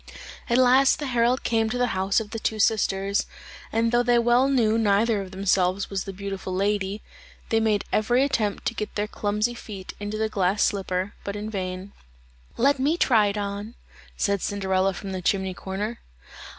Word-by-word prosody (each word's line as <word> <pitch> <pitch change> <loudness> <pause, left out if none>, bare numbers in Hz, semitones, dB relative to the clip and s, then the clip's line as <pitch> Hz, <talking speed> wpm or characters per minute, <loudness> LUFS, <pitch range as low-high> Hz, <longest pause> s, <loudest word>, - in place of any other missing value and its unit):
At 235 - +3
last 260 +1 +5
the 295 - -4
herald 245 0 +1
came 225 -1 +1
to 245 - -2
the 245 0 +1
house 190 +2 +1
of 220 -1 -7
the 225 - -4
two 220 - -1
sisters, 200 -2 +1 0.4
and 230 +1 +1
though 240 0 +4
they 245 0 +3
well 240 +2 +4
knew 235 -6 +2
neither 210 0 +2
of 190 - -7
themselves 190 0 0
was 195 -1 -2
the 195 - -5
beautiful 195 -1 -5
lady, 200 +1 -1 0.5
they 225 - +3
made 215 -2 +1
every 240 +5 +3
attempt 230 -8 -1
to - - 0
get 215 -2 -5
their 210 - 0
clumsy 210 +2 -1
feet 200 -5 -8
into 205 +1 -4
the 220 0 0
glass 200 -1 +1
slipper, 190 0 -1
but 200 - -4
in 210 +1 -5
vain. 185 -1 -4 0.7
"Let 275 +3 +3
me 295 +6 +1
try 225 -10 +4
it 200 +1 -2
on," 205 +3 -4 0.4
said 200 -2 0
Cinderella 190 -1 0
from 195 +2 -6
the 185 -1 -4
chimney 190 +1 0
corner. 205 +5 -5
210 Hz, 185 wpm, -25 LUFS, 195-230 Hz, 0.7 s, last